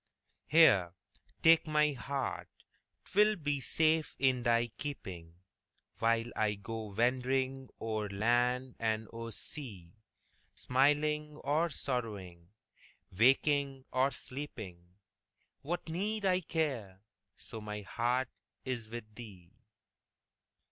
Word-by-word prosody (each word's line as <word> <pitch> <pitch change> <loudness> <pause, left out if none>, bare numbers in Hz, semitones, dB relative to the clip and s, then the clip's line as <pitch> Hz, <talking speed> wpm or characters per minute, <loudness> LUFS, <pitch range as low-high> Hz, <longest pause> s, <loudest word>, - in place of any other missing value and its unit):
Here, 100 - +6 0.5
take 165 0 +6
my 150 0 +3
heart 135 0 -3 0.6
'twill 210 +2 +4
be 145 -5 -1
safe 155 +3 +1
in 130 -2 +3
thy 120 -1 +2
keeping, 90 - -6 0.6
While 115 +1 +2
I 105 -1 +1
go 110 +2 -6
wandering 130 +4 0
o'er 110 -2 -2
land 120 +5 +1
and 110 -1 0
o'er 115 0 -6
sea; 105 - -8 0.6
Smiling 150 +3 +2
or 155 +4 +1
sorrowing, 100 - -4 0.6
waking 135 +5 +3
or 130 +1 +3
sleeping, 110 -12 -8 0.7
What 170 +5 -3
need 200 +6 -2
I 185 -1 +3
care, 130 - -2 0.4
so 110 - -9
my 105 0 -5
heart 120 +5 0 0.4
is 120 -4 -3
with 110 -2 -8
thee? 95 -7 -11
125 Hz, 100 wpm, -33 LUFS, 110-145 Hz, 0.7 s, Here